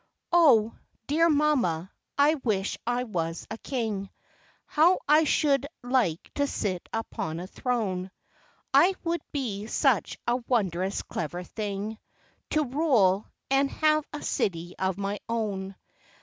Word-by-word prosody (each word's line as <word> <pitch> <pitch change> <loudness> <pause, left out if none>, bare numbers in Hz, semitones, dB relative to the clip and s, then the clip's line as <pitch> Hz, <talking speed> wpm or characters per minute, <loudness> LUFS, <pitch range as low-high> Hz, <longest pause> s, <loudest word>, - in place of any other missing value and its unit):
O! 255 -11 +5 0.3
dear 330 +4 +3
mamma, 260 - +2 0.3
I 290 +2 +5
wish 215 -9 -1
I 245 +1 +1
was 165 -7 -3
a 220 - -5
King, 220 -7 -3 0.6
How 335 +5 +4
I 305 +2 +6
should 280 -1 +2 0.2
like 245 -10 0
to 285 0 +1
sit 185 -9 -3
upon 170 -7 -3
a 180 - -5
throne. 195 -4 -2 0.6
It 350 +8 +5
would 335 -1 0
be 220 -8 -3
such - - +1
a 240 +1 +3
wondrous 195 -7 -1
clever 175 +2 -4
thing 210 +2 -4 0.5
To 305 - +2
rule, 245 - +2 0.2
and 275 0 +3
have 305 0 +2
a 295 - -6
city 175 -2 -1
of 190 -1 0
my 200 0 -2
own. 200 -4 -2
225 Hz, 130 wpm, -27 LUFS, 190-285 Hz, 0.6 s, I